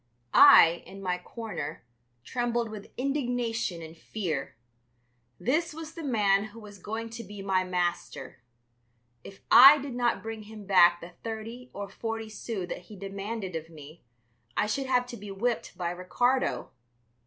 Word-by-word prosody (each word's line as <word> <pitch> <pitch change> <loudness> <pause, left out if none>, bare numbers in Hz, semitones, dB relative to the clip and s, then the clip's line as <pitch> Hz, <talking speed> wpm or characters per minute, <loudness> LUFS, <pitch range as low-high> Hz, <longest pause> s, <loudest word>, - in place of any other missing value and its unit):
I, 175 - +8
in 195 - -10
my 180 -2 -2
corner, 180 - -6 0.4
trembled 240 - -1
with 210 -2 -9
indignation 245 - -1
and 160 +1 -10
fear. 160 -6 -4 0.8
This 310 +6 0
was 320 0 -8
the 335 - -7
man 205 -6 +2
who 215 +2 -11
was 205 -2 -12
going 225 +4 -5
to 230 0 -7
be 205 -1 -9
my 190 -1 +1
master. 180 -7 -3 0.8
If 195 - -12
I 275 +4 +11
did 275 -2 -6
not 240 -1 0
bring 225 0 -6
him 215 -1 -11
back 175 -3 +5
the 170 - -9
thirty 230 +3 -6
or 200 0 -6
forty 225 +2 -5
sous 215 -3 -5
that 180 - -6
he 215 - -12
demanded 195 0 -5
of 160 0 -5
me, 155 0 -13 0.6
I - - +3
should 265 +6 -2
have 250 -1 +2
to 245 -1 -8
be 205 0 -9
whipped 225 +5 -2
by 175 -1 -2
Ricardo. 245 +9 0
215 Hz, 155 wpm, -28 LUFS, 185-240 Hz, 0.8 s, I